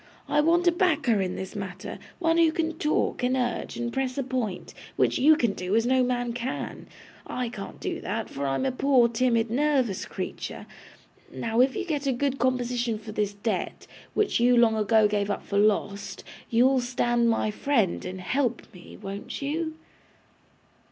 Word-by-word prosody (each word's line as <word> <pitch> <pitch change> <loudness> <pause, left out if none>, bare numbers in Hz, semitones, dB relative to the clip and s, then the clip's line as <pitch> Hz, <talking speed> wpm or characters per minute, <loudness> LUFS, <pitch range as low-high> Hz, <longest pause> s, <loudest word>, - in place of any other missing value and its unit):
'I 295 - +3
want 340 +3 +3
a - - +7
backer 310 - +2
in 185 -1 -2
this 190 +3 -6
matter; 185 -2 -6 0.2
one 330 -1 +2
who 330 -1 +5
can 325 0 -1
talk, 300 -2 0
and 250 +1 +1
urge, 245 -2 -2
and 240 0 -3
press 265 -1 -2
a 275 - 0
point, 245 -7 -3 0.2
which - - +2
you 310 +4 +7
can 235 -9 +1
do 185 +2 -2
as 230 +1 +3
no 260 +1 +3
man 245 -1 0
can. 245 +2 -5 0.4
I 250 -1 -3
can't 195 -4 -8
do - - -4
that, 220 +2 -3
for 140 0 -4
I 135 - 0
am 265 - -1
a 265 - +1
poor, 255 -2 +4
timid, 230 -1 +1
nervous 260 -6 +1
creature. - - -6 0.7
Now, 230 +1 0
if 260 +1 +3
you 385 - -2
get 295 -5 -2
a 270 - +2
good 275 +2 -1
composition 245 -2 0
for 215 0 -9
this 205 -1 -1
debt, 220 +2 -3 0.3
which 420 - +2
you 245 +1 +4
long 230 -2 +5
ago 215 0 +4
gave 205 -1 -1
up 205 - -3
for 200 - 0
lost, 200 -1 0 0.3
you'll 255 +3 +4
stand 240 -1 +1
my 225 -1 +1
friend, 225 -5 0
and 185 0 -6
help 260 +6 0
me. 180 -2 -12
Won't 200 0 -6
you? 315 +3 -2
240 Hz, 185 wpm, -26 LUFS, 210-270 Hz, 0.7 s, a